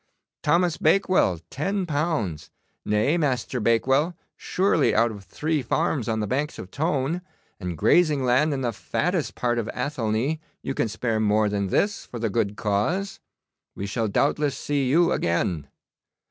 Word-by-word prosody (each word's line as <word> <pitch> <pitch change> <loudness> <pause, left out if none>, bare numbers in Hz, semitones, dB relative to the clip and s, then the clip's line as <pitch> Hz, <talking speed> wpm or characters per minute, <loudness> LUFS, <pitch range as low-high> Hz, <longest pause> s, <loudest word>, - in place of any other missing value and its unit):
Thomas 175 -1 +2
Bakewell, 160 - +3
ten 195 +7 -1
pounds. 145 - -2 0.3
Nay, 110 +11 +2
Master 130 -4 -1
Bakewell, 135 +9 +2 0.2
surely 185 -5 +1
out 115 +1 +3
of 100 -2 -10
three 155 -1 -1
farms 130 -1 0
on 110 -1 0
the - - 0
banks 140 +8 -2
of 95 - -9
Tone, 155 +2 -1 0.4
and 90 -4 -4
grazing 150 - +3
land 130 +5 +3
in 135 -2 -2
the 120 -2 -1
fattest 175 - -1
part 120 -1 0
of 115 - -3
Athelney, 125 +2 -1 0.2
you 135 - -2
can 120 - 0
spare 110 +1 -1
more 105 0 +2
than 100 -1 -1
this 200 - 0
for 120 - -8
the 115 -2 -1
good 105 -1 0
cause. 115 - -1 0.6
We 100 - -4
shall 110 +2 -1
doubtless 140 +5 +1
see 140 -3 -1
you 170 +5 +4
again. 85 -3 0
130 Hz, 155 wpm, -25 LUFS, 110-155 Hz, 0.6 s, you